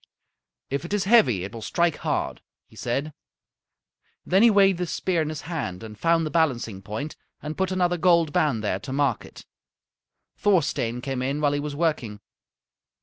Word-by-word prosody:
"If 140 +1 -1
it 175 +4 -2
is 205 - 0
heavy 155 - +4
it 95 - -6
will 115 - -7
strike 170 +6 +1
hard," - - -2 0.2
he - - -21
said. 135 +7 -2 1.1
Then 190 +2 +3
he 235 - +7
weighed 195 -3 +4
the 180 - -1
spear 175 0 0
in 155 - -2
his 155 -2 -5
hand 140 - -5
and 110 -1 -9
found 165 +7 +2
the 155 - -4
balancing 120 - 0
point 110 +10 -5 0.2
and 150 +1 -6
put 190 0 -1
another 180 -1 +1
gold 170 -3 +3
band 125 -8 +1
there 95 -2 -1
to 115 - -8
mark 135 -4 0
it. - - -13 0.9
Thorstein 155 - +1
came 135 -1 -3
in 135 +3 -1
while 145 -1 +2
he 145 - 0
was 145 0 -4
working. 145 -10 -1
150 Hz, 180 wpm, -25 LUFS, 120-170 Hz, 1.1 s, he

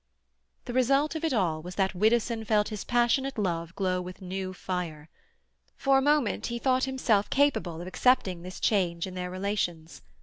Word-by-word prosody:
The 245 - -5
result 275 +4 +2
of 320 0 -5
it 325 - +1
all 175 -10 0
was 180 +3 -8
that 190 -1 +1
Widdowson 225 +3 +1
felt 210 -1 +2
his 210 -3 -5
passionate 245 +3 +1
love 170 -4 -2
glow 185 -2 0
with 180 +1 -8
new 190 0 -4
fire. 175 -5 -5 0.7
For 270 -1 +3
a - - 0
moment 290 -5 +1
he 235 - -3
thought 260 +1 +2
himself 245 -6 +1
capable 270 - +1
of - - -7
accepting 185 -4 +2
this 185 +1 -8
change 175 -5 +1
in 190 - -8
their 180 0 -4
relations. 180 -4 -3
200 Hz, 175 wpm, -28 LUFS, 180-250 Hz, 0.7 s, For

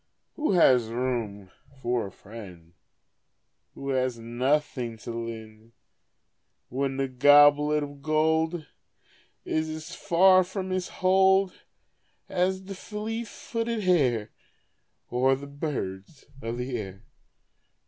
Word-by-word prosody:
Who 305 -8 0
has 130 -9 +5
room 115 -5 -3 0.3
for 120 -4 -1
a - - -11
friend 95 -6 -12 1.0
Who 140 - -6
has 130 -2 0
nothing 120 0 -1
to 110 - -7
lend, 115 -1 -7 1.0
When 135 +1 -2
the 135 0 0
goblet 145 +3 +5
of 145 -1 -9
gold 160 +2 +1 0.8
Is 155 0 -1
as 155 0 -7
far 185 +2 +5
from 190 +1 -5
his 185 -1 -1
hold 190 0 +3 0.7
As 190 +1 0
the 195 +1 -7
fleet 220 +4 -5
footed 230 0 -3
hare, 130 - +2 0.8
Or 130 +2 +3
the 140 +2 -8
birds 140 - -5 0.2
of 115 0 -4
the 125 +1 -3
air. 100 0 -8
140 Hz, 110 wpm, -27 LUFS, 115-180 Hz, 1.0 s, has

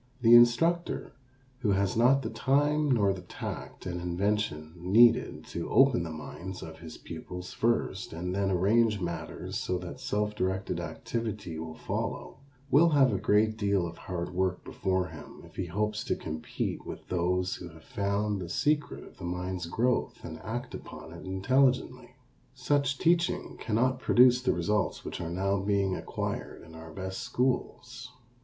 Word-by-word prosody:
The 115 +1 +7
instructor 165 +9 +4 0.5
who 105 -6 +2
has 100 0 +1
not 130 +4 +4
the - - -3
time 145 +2 +2
nor 105 -7 +3
the 95 - -7
tact 90 - -7
and 90 -1 -3
invention 90 -3 -1
needed 110 +7 +4
to 85 - -4
open 135 -7 +5
the 85 - -4
minds 80 +4 -7
of 80 0 -9
his 80 -1 -9
pupils 90 0 -8
first 115 -4 0
and 90 +2 -4
then 100 0 +1
arrange 105 +4 +3
matters 85 -2 -4
so 90 - -1
that 90 +5 -7
self 105 -4 -1
directed 95 -3 -1
activity 90 +1 -4
will 80 -1 -6
follow, - - -4 0.3
will 165 +5 +6
have 135 -6 +4
a 95 - 0
great 110 +1 +3
deal 100 -4 +1
of 85 0 -7
hard 90 -1 -4
work 95 0 -1
before 95 -1 -1
him 75 -2 -11
if - - -17
he 90 - -3
hopes 105 +4 -1
to - - 0
compete 80 0 -4
with - - -8
those 90 +1 0
who 90 - -8
have 80 0 -15
found 100 0 -1
the 85 - -6
secret 150 - 0
of - - -15
the - - -9
mind's 90 0 -3
growth 120 +7 0
and 80 -1 -7
act 120 +5 -5
upon - - -9
it - - -10
intelligently. 130 +8 +1 0.4
Such 140 -1 +1
teaching 170 +1 +1
cannot 125 +3 +1
produce 125 -1 +5
the 130 - +2
results 100 +4 0
which - - -5
are 85 - -3
now 95 +3 0
being 100 -1 +1
acquired - - -4
in 80 - -14
our 80 0 -10
best 95 +3 -5
schools. 125 0 -2
100 Hz, 165 wpm, -29 LUFS, 90-120 Hz, 0.5 s, The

